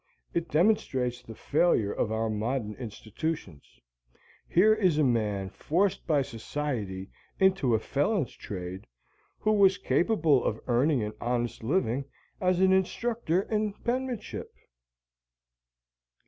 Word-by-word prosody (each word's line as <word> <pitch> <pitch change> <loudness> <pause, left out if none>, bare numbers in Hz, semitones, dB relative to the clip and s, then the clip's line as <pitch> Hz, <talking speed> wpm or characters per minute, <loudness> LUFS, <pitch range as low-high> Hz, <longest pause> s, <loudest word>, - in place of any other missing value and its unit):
It 170 -1 -1
demonstrates 130 - +1
the 115 - -11
failure 140 -9 +2
of 110 - -1
our 110 0 0
modern 110 +1 -2
institutions. 110 - -6 0.7
Here 210 +5 +5
is 185 -8 +2
a 155 - +4
man 105 -6 0
forced 190 +4 0
by 150 -4 +3
society 115 -6 -4 0.3
into 190 - +3
a - - +1
felon's 145 - 0
trade 90 -1 -7 0.5
who 215 - +1
was 195 -3 +5
capable 155 - +2
of 110 - -1
earning 125 +1 +2
an 105 0 -4
honest 120 0 -1
living 135 -2 0 0.4
as 185 -1 +2
an 190 0 +5
instructor 190 -1 0
in 215 -1 -1
penmanship. 245 0 -3
140 Hz, 120 wpm, -28 LUFS, 110-190 Hz, 0.7 s, Here